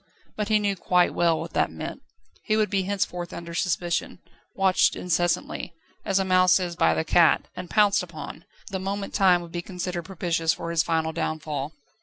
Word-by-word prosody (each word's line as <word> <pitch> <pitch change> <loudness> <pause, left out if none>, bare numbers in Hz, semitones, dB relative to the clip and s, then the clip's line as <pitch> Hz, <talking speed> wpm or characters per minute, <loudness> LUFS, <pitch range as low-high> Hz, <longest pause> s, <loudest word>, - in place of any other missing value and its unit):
But 210 -1 -2
he 215 0 +4
knew 205 -1 0
quite 180 -1 +2
well 165 -2 +2
what - - -7
that - - +2
meant. - - -7 0.4
He 215 -1 +2
would 215 -1 +1
be 195 -1 +2
henceforth 180 -3 -2
under 170 0 -7
suspicion, 175 -1 -1 0.4
watched 190 -1 +3
incessantly, 175 0 -1 0.3
as 195 - +1
a 190 - +1
mouse 185 0 +5
is 175 -2 -3
by 80 - +3
the 80 - 0
cat, - - +4
and 180 -1 -7
pounced 210 -2 +4
upon, 165 -2 -8 0.3
the 190 - -2
moment 195 +1 -4
time 180 -3 +4
would 170 - -11
be 175 - -3
considered 180 -1 -5
propitious 170 -3 0
for 170 - -5
his 170 -2 +3
final 160 -1 0
downfall. 155 -2 -3
180 Hz, 185 wpm, -25 LUFS, 165-195 Hz, 0.4 s, mouse